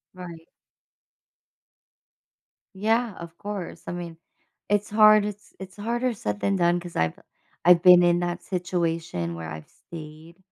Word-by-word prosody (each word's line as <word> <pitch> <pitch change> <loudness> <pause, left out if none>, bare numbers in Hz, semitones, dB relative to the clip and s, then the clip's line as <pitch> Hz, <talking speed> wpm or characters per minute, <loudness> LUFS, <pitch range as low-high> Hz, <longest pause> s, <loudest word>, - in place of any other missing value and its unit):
Right. 170 -3 -10 2.3
Yeah, 225 +3 0
of 170 0 -10
course. 205 -4 -7
I - - -3
mean, 170 -2 -7 0.5
it's 205 0 +1
hard 215 0 +6
it's 210 0 -8
it's 190 +1 -10
harder 240 +4 -1
said 105 - -4
than 200 - 0
done 175 -1 +2
'cause 175 -1 -10
I've 80 0 0 0.5
I've 175 0 +6
been 180 -1 +8
in 175 0 +3
that 175 0 -3
situation 165 - -2
where 80 -1 -7
I've 80 -1 -9
stayed, 160 +1 -12
175 Hz, 135 wpm, -25 LUFS, 165-205 Hz, 2.3 s, been